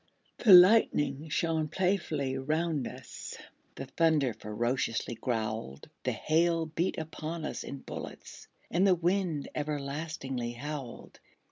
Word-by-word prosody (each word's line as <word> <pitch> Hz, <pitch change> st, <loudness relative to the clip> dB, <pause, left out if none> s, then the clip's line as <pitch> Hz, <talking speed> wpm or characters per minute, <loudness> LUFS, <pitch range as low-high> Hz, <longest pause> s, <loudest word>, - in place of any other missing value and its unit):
The 220 Hz, -, +5 dB
lightning 175 Hz, -6 st, +6 dB
shone 160 Hz, 0 st, 0 dB
playfully 165 Hz, -7 st, 0 dB
round 155 Hz, +1 st, -1 dB
us; -, -, -8 dB, 0.4 s
The 135 Hz, -, -6 dB
thunder 145 Hz, -2 st, +2 dB
ferociously 115 Hz, +2 st, -2 dB
growled; 110 Hz, -, -3 dB
The -, -, +2 dB
hail 165 Hz, +1 st, +1 dB
beat 160 Hz, +3 st, -2 dB
upon 160 Hz, 0 st, -5 dB
us -, -, -4 dB
in 140 Hz, -, -7 dB
bullets; -, -, -9 dB, 0.2 s
And 185 Hz, +4 st, +3 dB
the 185 Hz, -, +5 dB
wind 175 Hz, -3 st, 0 dB
everlastingly 140 Hz, -4 st, -3 dB
howled. 135 Hz, 0 st, -7 dB
155 Hz, 115 wpm, -30 LUFS, 130-165 Hz, 0.4 s, lightning